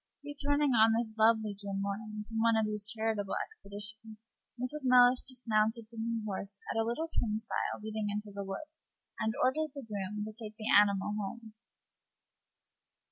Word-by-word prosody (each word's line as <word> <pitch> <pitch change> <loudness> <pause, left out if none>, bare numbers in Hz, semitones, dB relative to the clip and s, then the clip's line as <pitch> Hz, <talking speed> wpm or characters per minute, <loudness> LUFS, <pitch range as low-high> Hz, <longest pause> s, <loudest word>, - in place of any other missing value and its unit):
Returning 290 0 +1
on 225 -1 +6
this 230 -2 -2
lovely 220 -1 +4
June 200 -1 -4
morning 210 +2 -4
from 225 -1 -3
one 230 0 +4
of 220 - +3
these 210 -1 -2
charitable 220 -2 0
expeditions, 215 - -7 0.4
Mrs. 255 +5 -3
Mellish 250 0 +7
dismounted 230 -3 0
from 230 -1 -10
her 230 -1 -2
horse 200 -1 -4
at 225 - 0
a - - +3
little 240 +9 -1
turnstile 220 -7 -2
leading 215 -1 -2
into 210 0 -4
the 200 0 -4
wood, 195 +10 -5 0.5
and 220 0 0
ordered 305 +3 +1
the 280 -3 -7
groom 210 0 -3
to 215 - -6
take 215 -1 -8
the 215 - -1
animal 200 0 +4
home. 220 +2 -6
220 Hz, 160 wpm, -32 LUFS, 210-235 Hz, 0.5 s, Mellish